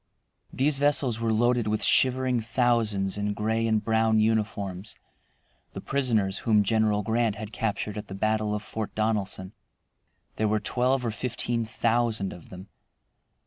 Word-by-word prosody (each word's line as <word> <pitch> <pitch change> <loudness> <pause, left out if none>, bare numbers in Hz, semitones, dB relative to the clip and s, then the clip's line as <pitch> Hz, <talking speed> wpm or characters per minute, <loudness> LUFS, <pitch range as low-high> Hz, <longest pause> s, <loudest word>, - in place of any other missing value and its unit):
These 135 +1 +1
vessels 140 -5 +2
were 115 -1 0
loaded 120 +1 +2
with 105 0 0
shivering 130 -1 +3
thousands 110 -5 0
in 105 0 -1
gray 110 +2 0
and 110 -1 +1
brown 110 0 +2
uniforms, 105 -3 -1 0.8
the - - -6
prisoners 115 -8 0
whom 105 -2 +3
General 105 0 +1
Grant 115 0 0
had 110 0 -8
captured 105 -1 -2
at - - -9
the 95 - -7
battle 110 +1 0
of 105 - -4
Fort 110 0 -5
Donelson. 105 -3 -2 0.8
There 110 - +1
were 105 +1 +1
twelve 125 +4 0
or 115 - 0
fifteen 120 +1 -2
thousand 115 -3 0
of 85 - -13
them. 95 +2 -11
110 Hz, 145 wpm, -26 LUFS, 105-120 Hz, 0.8 s, shivering